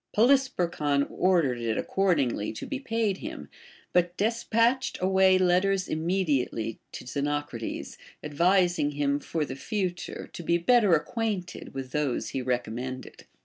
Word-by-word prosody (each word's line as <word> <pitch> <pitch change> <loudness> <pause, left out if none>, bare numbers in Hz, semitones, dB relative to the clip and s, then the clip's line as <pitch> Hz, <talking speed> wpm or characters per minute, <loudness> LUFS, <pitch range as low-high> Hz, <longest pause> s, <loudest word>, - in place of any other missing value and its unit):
Poly 235 +6 +6
sperchon 165 - -1
ordered 170 -10 +2
it 115 -2 -1
accordingly 145 - 0
to - - -6
be 275 - -4
paid 225 -6 -1
him, - - -7 0.4
but 175 0 +2
des 225 +3 +1
patched 230 +4 +2
away 190 0 +4
letters 185 +1 +2
immediately 155 - -1
to - - -8
Xenocrates, 145 -3 -3 0.3
advising 175 0 +2
him 145 0 0
for 155 +1 -2
the 130 - -6
future 180 - -4
to - - -6
be 170 +1 +2
better 205 0 +4
acquainted 205 - -3
with 130 -1 -5
those 150 -3 -1
he 135 - -3
recommended. 125 +1 -4
170 Hz, 135 wpm, -27 LUFS, 140-195 Hz, 0.4 s, Poly